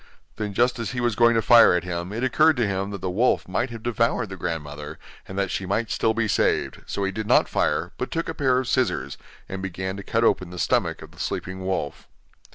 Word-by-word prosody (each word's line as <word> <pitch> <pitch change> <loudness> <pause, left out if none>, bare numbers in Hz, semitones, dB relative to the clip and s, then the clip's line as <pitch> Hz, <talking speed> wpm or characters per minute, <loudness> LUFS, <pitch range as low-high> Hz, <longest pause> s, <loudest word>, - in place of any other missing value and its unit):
Then 105 -2 -4
just 120 +2 +2
as 115 -1 -3
he 125 - -3
was 120 -2 0
going 120 0 +5
to 115 - +2
fire 115 -4 +7
at 90 - 0
him, 85 0 -4
it 115 +4 -3
occurred 145 +5 +4
to 120 - +2
him 95 0 -2
that 100 -1 -6
the 95 - -2
wolf 115 +7 +1
might 120 +8 -1
have 115 -1 -9
devoured 115 -1 0
the 95 - -6
grandmother, 75 -3 -5 0.3
and 95 - -8
that 100 -2 0
she 95 - -3
might 110 +3 -1
still 110 -1 +1
be 115 -1 +1
saved, 100 - 0
so 100 - -3
he 95 - 0
did 110 +2 -5
not - - +4
fire, - - 0
but - - -2
took 165 - -2
a - - -3
pair 130 -3 +2
of 130 -1 -1
scissors, 130 -1 0 0.3
and 95 -1 -5
began 95 0 -4
to 100 - -7
cut 115 +3 0
open 95 -5 +2
the 90 - -9
stomach - - 0
of - - -13
the - - -18
sleeping 95 0 -4
wolf. 95 -6 -3
100 Hz, 245 wpm, -24 LUFS, 95-120 Hz, 0.3 s, fire